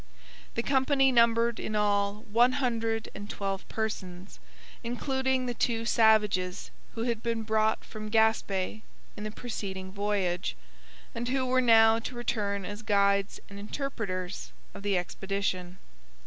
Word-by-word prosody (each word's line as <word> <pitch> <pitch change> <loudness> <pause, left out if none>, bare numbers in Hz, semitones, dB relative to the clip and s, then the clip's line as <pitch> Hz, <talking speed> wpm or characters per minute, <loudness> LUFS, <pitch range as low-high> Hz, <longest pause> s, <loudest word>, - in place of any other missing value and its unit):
The 230 - 0
company 270 0 +3
numbered 235 -1 +3
in 215 - -3
all 205 0 +1
one 240 +4 +3
hundred 230 -5 -1
and 205 0 -8
twelve 195 -2 -4
persons, 190 -4 -4 0.4
including 265 +2 0
the 245 - -2
two 230 -1 0
savages 210 -6 +3 0.2
who 225 - -2
had 235 -2 -1
been 230 -1 -1
brought 220 0 +1
from 215 -1 -7
Gaspe 215 -2 +1 0.3
in 210 - -7
the 215 - -3
preceding 195 -5 -5
voyage, 195 - -1 0.6
and 240 +1 -3
who 260 0 +1
were 255 0 +3
now 225 -2 +6
to 245 - -6
return 205 -5 -2
as 205 +3 -6
guides 200 -2 +2
and 200 0 -10
interpreters 200 - -4 0.2
of - - -9
the 200 -2 +1
expedition. 185 0 -3
220 Hz, 135 wpm, -29 LUFS, 200-235 Hz, 0.6 s, now